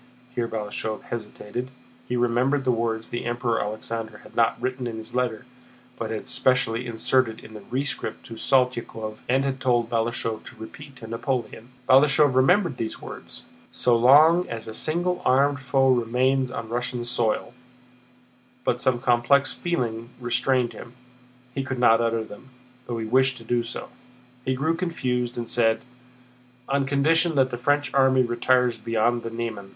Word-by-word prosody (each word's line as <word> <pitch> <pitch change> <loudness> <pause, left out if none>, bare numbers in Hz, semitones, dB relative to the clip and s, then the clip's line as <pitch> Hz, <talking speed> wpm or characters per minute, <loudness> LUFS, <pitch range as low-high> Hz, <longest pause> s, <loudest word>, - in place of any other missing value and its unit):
Here 120 -2 -1
Balashëv 110 0 -4
hesitated: 120 +2 -6 0.4
he 125 - 0
remembered 125 +4 +1
the 130 - +3
words 115 -1 -1
the 120 - -4
Emperor 120 -1 0
Alexander 110 +1 -5
had - - -16
not 115 -1 +2
written 130 -1 -3
in 115 -1 -5
his 110 +2 -8
letter, 125 -3 -1 0.5
but 115 - -4
had 110 -1 -5
specially 125 -2 +1
inserted 115 0 +1
in 110 - -13
the 105 - -9
rescript 135 +3 -3
to 115 - -9
Saltykóv 115 -3 0
and 130 +2 +3
had 135 -1 -2
told 120 -3 +1
Balashëv 115 -1 -1
to - - -11
repeat 135 +5 -11
to 120 - -11
Napoleon. 115 +1 -3 0.2
Balashëv 135 +1 +5
remembered 155 +3 +3
these 110 -1 -4
words, - - -7 0.3
"So 120 - +2
long 150 +9 +6
as 115 -1 -5
a 110 - -6
single 175 +7 0
armed 140 +2 +3
foe 130 0 +2
remains 130 +2 +1
on 115 -3 -6
Russian 120 0 -2
soil," 120 -1 0 1.1
but 120 - +1
some 130 -2 +2
complex 125 +3 +3
feeling 120 -9 -2
restrained 125 0 +1
him. 120 - -11 0.6
He 135 - -2
could 130 -1 -4
not 115 -2 +5
utter 115 -1 0
them, 110 +4 -12 0.4
though 120 - -3
he 110 - -3
wished 130 +3 +2
to 115 - -11
do 120 +1 0
so. 115 - -6 0.6
He 130 0 0
grew 150 +5 0
confused 125 -9 -2
and 120 -1 -3
said: 115 -2 +2 0.9
"On 140 0 0
condition 160 +4 +3
that 130 -2 +3
the 120 - -3
French 145 -1 +1
army 130 -1 +4
retires 120 0 +1
beyond 115 +1 +1
the 115 - -5
Niemen." 115 -4 -5
120 Hz, 160 wpm, -25 LUFS, 115-130 Hz, 1.1 s, long